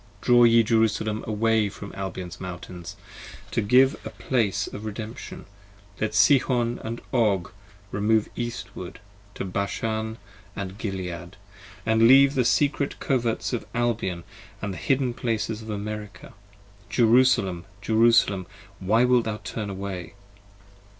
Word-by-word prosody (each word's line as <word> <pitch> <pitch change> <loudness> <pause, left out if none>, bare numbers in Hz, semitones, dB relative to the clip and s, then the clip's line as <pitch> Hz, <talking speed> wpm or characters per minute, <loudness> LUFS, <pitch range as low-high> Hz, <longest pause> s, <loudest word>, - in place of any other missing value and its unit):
Draw 120 +1 +5
ye 115 0 +6
Jerusalem 110 -1 +1
away 110 -1 +2
from 100 0 -9
Albion's 95 -2 -6
Mountains 90 -1 -7 0.6
To - - +1
give 130 +6 +5
a - - -5
Place 105 -3 -1
for - - -6
Redemption, 110 +3 -7 0.5
let 110 0 -1
Sihon 125 -2 +3
and 115 +1 -4 0.2
Og 105 -8 +2
64 - - -23 0.4
Remove 105 +2 +1
Eastward 120 -1 -6 0.4
to - - -4
Bashan 110 +3 -2 0.4
and 100 0 -6
Gilead, 90 -3 -5 0.5
and 110 0 +4
leave 135 +2 +8
p. - - -8
49 - - -10
THE 125 -2 +2
secret 140 +2 +1
coverts 120 -2 -1
of 120 - -3
Albion 115 -8 -1 0.2
& 100 - -22
the 100 -2 -3
hidden 130 0 0
places 115 -2 -2
of 110 - -10
America. 105 -2 -6 0.6
Jerusalem! 115 -7 +3 0.2
Jerusalem 110 -4 +3 0.3
1 95 - -9
why 115 +3 +5
wilt 125 -2 +3
thou 110 -1 -2
turn 105 -2 -4
away? 95 -3 -6
110 Hz, 135 wpm, -25 LUFS, 100-120 Hz, 0.6 s, leave